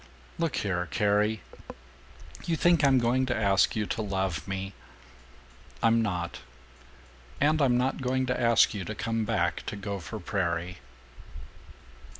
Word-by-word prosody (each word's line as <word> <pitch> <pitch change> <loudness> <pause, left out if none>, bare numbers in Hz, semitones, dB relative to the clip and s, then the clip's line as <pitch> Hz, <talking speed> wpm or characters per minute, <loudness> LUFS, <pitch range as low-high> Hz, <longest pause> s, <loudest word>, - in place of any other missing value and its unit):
"Look 165 -4 0
here, 90 -3 -1
Carrie; 105 +7 +1 1.0
you 170 - 0
think 170 -1 +3
I'm 135 -2 +5
going 125 +2 +2
to 120 - 0
ask 100 -3 +3
you 105 -1 0
to 110 - -3
love 95 -6 -2
me. 95 0 -4 1.1
I'm 115 0 +4
not. 90 -5 -3 1.0
And 155 +2 +3
I'm 125 -3 +4
not 130 +2 0
going 130 0 0
to 125 0 -1
ask 115 -2 +4
you 100 -3 -4
to 110 - -5
come 115 0 -1
back - - 0
to - - -3
Gopher 100 +1 -5
Prairie!" 90 -2 -2
110 Hz, 140 wpm, -28 LUFS, 95-125 Hz, 1.1 s, I'm